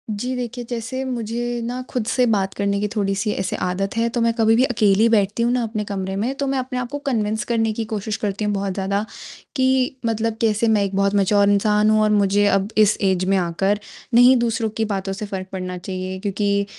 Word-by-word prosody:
जी, 245 Hz, +5 st, -3 dB
देखिए 245 Hz, 0 st, -4 dB
जैसे 245 Hz, +2 st, -4 dB
मुझे 240 Hz, -1 st, -3 dB
ना 245 Hz, +2 st, -4 dB
खुद 245 Hz, -4 st, -2 dB
से 250 Hz, 0 st, +2 dB
बात 195 Hz, -4 st, 0 dB
करने 200 Hz, 0 st, -1 dB
की 210 Hz, -, 0 dB
थोड़ी-सी 200 Hz, 0 st, 0 dB
ऐसे 190 Hz, -2 st, -2 dB
आदत 190 Hz, +3 st, -2 dB
है, 230 Hz, 0 st, +2 dB
तो 235 Hz, 0 st, -2 dB
मैं 230 Hz, 0 st, +2 dB
कभी 225 Hz, -1 st, +3 dB
भी 245 Hz, -, +4 dB
अकेली 215 Hz, -3 st, +3 dB
बैठती 210 Hz, 0 st, +2 dB
हूँ 240 Hz, -, +2 dB
ना 250 Hz, -1 st, +1 dB
अपने 220 Hz, -1 st, -3 dB
कमरे 190 Hz, -1 st, -4 dB
में 225 Hz, +7 st, -1 dB
तो 280 Hz, 0 st, -2 dB
मैं 270 Hz, 0 st, 0 dB
अपने 255 Hz, 0 st, -3 dB
आप 245 Hz, -1 st, -4 dB
को 290 Hz, -, -3 dB
कन्विन्स 220 Hz, -5 st, 0 dB
करने 225 Hz, -1 st, +1 dB
की 225 Hz, +1 st, -3 dB
कोशिश 215 Hz, 0 st, -3 dB
करती 205 Hz, 0 st, -2 dB
हूँ, 205 Hz, -, 0 dB
बहुत 195 Hz, -1 st, -2 dB
ज़्यादा 200 Hz, +2 st, -1 dB, 0.5 s
कि 260 Hz, -1 st, +1 dB
मतलब 225 Hz, 0 st, -1 dB
कैसे 225 Hz, 0 st, +2 dB
मैं 215 Hz, -2 st, +3 dB
एक 195 Hz, -1 st, -3 dB
बहुत 200 Hz, 0 st, +2 dB
मैच्योर 200 Hz, 0 st, +3 dB
इंसान 210 Hz, +1 st, +3 dB
हूँ 215 Hz, 0 st, +4 dB
और 215 Hz, -, +3 dB
मुझे 205 Hz, 0 st, +3 dB
अब 195 Hz, -1 st, +2 dB
इस 215 Hz, -1 st, +4 dB
ऐज 190 Hz, -1 st, +2 dB
में 195 Hz, +1 st, +2 dB
आकर, 190 Hz, +3 st, 0 dB, 0.3 s
नहीं 245 Hz, +2 st, +7 dB
दूसरों 230 Hz, -1 st, 0 dB
की 220 Hz, -, +1 dB
बातों 195 Hz, -2 st, -3 dB
से 210 Hz, +2 st, -5 dB
फ़र्क 190 Hz, -2 st, -5 dB
पड़ना 185 Hz, -1 st, -5 dB
चाहिए 185 Hz, +1 st, -5 dB
क्योंकि 200 Hz, 0 st, 0 dB
210 Hz, 225 wpm, -21 LUFS, 195-235 Hz, 0.5 s, नहीं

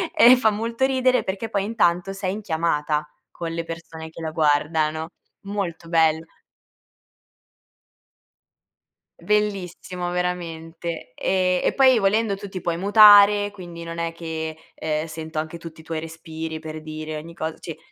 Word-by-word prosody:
e 250 Hz, +2 st, +8 dB
fa 225 Hz, -3 st, +3 dB
molto 230 Hz, +4 st, -1 dB
ridere, 255 Hz, -2 st, +2 dB
perché 200 Hz, +4 st, -4 dB
poi 200 Hz, -3 st, 0 dB
intanto 195 Hz, -4 st, +1 dB
sei 195 Hz, -1 st, -3 dB
in 210 Hz, -, -5 dB
chiamata 155 Hz, -4 st, -1 dB, 0.2 s
con 170 Hz, -1 st, -5 dB
le 165 Hz, 0 st, -2 dB
persone 165 Hz, -1 st, -8 dB
che 165 Hz, +1 st, -11 dB
la 160 Hz, -1 st, -3 dB
guardano. 155 Hz, +1 st, +1 dB, 0.3 s
Molto 195 Hz, -5 st, -4 dB
bello. 160 Hz, -1 st, +3 dB, 2.9 s
Bellissimo 185 Hz, -4 st, -2 dB
veramente. 170 Hz, -4 st, -4 dB
E 185 Hz, -1 st, +1 dB
e -, -, +2 dB
poi 260 Hz, -3 st, +5 dB
volendo 205 Hz, +1 st, +2 dB
tu 200 Hz, 0 st, -9 dB
ti 190 Hz, -, -5 dB
puoi 170 Hz, -1 st, -2 dB
mutare, 205 Hz, +1 st, +7 dB
quindi 175 Hz, -4 st, -9 dB
non 165 Hz, 0 st, -7 dB
è 170 Hz, 0 st, -2 dB
che, 160 Hz, -1 st, -5 dB, 0.2 s
ehm, 155 Hz, 0 st, -2 dB
sento 160 Hz, -1 st, -5 dB
anche 160 Hz, +2 st, -5 dB
tutti 165 Hz, -1 st, -11 dB
i 160 Hz, -, -12 dB
tuoi 160 Hz, -1 st, -4 dB
respiri 160 Hz, 0 st, -6 dB
per 155 Hz, 0 st, -7 dB
dire 155 Hz, 0 st, -6 dB
ogni 165 Hz, +2 st, -9 dB
cos 160 Hz, -1 st, -4 dB
cioè, 165 Hz, -, -7 dB
170 Hz, 145 wpm, -23 LUFS, 160-200 Hz, 2.9 s, e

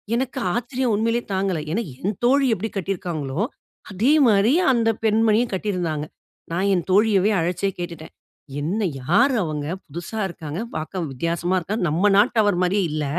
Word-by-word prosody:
எனக்கு 260 Hz, +1 st, -2 dB, 0.2 s
ஆச்சரியம், 245 Hz, 0 st, -1 dB
உண்மைலயே 230 Hz, +3 st, 0 dB
தாங்கல. 190 Hz, -3 st, 0 dB
ஏன்னா, 220 Hz, +7 st, 0 dB, 0.2 s
என் 200 Hz, +3 st, -2 dB
தோழி 275 Hz, +2 st, +4 dB
எப்டி 220 Hz, +5 st, -4 dB
கட்டிருக்காங்களோ, 170 Hz, -5 st, -3 dB, 0.5 s
அதே 225 Hz, +10 st, +2 dB
மாரி, 215 Hz, +4 st, +4 dB, 0.2 s
அந்த 230 Hz, -3 st, +2 dB, 0.2 s
பெண்மணியும் 220 Hz, +2 st, +3 dB
கட்டிருந்தாங்க. 175 Hz, -6 st, -2 dB, 0.5 s
நான் 185 Hz, +4 st, 0 dB
என் 175 Hz, -3 st, 0 dB
தோழியவே 205 Hz, 0 st, +4 dB
அழைச்சே 180 Hz, +4 st, 0 dB
கேட்டுட்டேன். 170 Hz, -2 st, -7 dB, 0.5 s
"என்ன? 180 Hz, +9 st, -1 dB, 0.2 s
யார் 230 Hz, -, +3 dB
அவுங்க? 150 Hz, -2 st, -3 dB, 0.2 s
புதிசா 170 Hz, +8 st, -6 dB
இருக்காங்க. 165 Hz, -1 st, -6 dB, 0.2 s
பார்க்கவும் 160 Hz, 0 st, -4 dB
வித்தியாசமா 170 Hz, +6 st, -1 dB
இருக்காங்க. 195 Hz, +5 st, -3 dB
நம் 170 Hz, +7 st, +2 dB
நாட்டவர் 210 Hz, -3 st, +3 dB
மாரியே 195 Hz, +2 st, +2 dB
இல்ல. 150 Hz, -1 st, -2 dB
195 Hz, 140 wpm, -22 LUFS, 170-225 Hz, 0.5 s, தோழி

